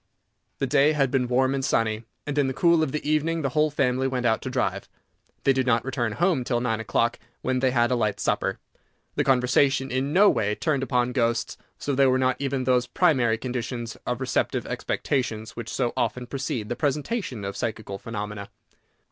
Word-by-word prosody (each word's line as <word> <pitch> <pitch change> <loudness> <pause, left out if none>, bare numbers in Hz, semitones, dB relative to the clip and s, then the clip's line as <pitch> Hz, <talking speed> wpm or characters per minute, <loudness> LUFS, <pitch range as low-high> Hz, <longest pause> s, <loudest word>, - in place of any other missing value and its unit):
The - - 0
day 145 +2 +4
had 135 -4 +1
been 130 -2 +1
warm 130 +2 +2
and 135 -1 -2
sunny; 110 -2 0 0.2
and, 145 - -3
in 145 -2 +2
the 130 - -3
cool 170 0 +4
of 155 -4 0
the 150 0 -3
evening, 155 +2 +1
the 140 - +1
whole 150 +4 +2
family 130 -2 +1
went 130 -2 -2
out 110 -1 +2
to - - -4
drive. - - -2 0.5
They 135 - +4
did 130 -1 0
not 120 -1 +2
return 120 -4 -1
home 170 - +1
till 120 -1 0
nine 115 -2 -1
o'clock, 115 +2 0 0.2
when 130 0 0
they 130 0 +3
had 120 -1 +2
a - - +3
light 110 -4 0
supper. - - 0 0.6
The - - +1
conversation 135 +1 +2
in 130 +3 -1
no 195 +6 +6
way 105 - +2
turned 150 0 0
upon 125 -2 +1
ghosts, 120 -3 0 0.2
so 145 - -2
there 135 0 +4
were 130 - +3
not 130 0 +1
even 135 -1 -1
those 125 -1 +2
primary 130 -9 +2
conditions 120 -1 -4
of - - -1
receptive - - -1
expectations 110 -5 -2
which 115 -2 -6
so 120 -3 -1
often 120 +2 -1
precede 125 -4 -3
the 120 - -1
presentation 145 - -2
of 100 - -4
psychical 110 -3 -4
phenomena. 105 -2 -6
130 Hz, 200 wpm, -25 LUFS, 120-140 Hz, 0.6 s, no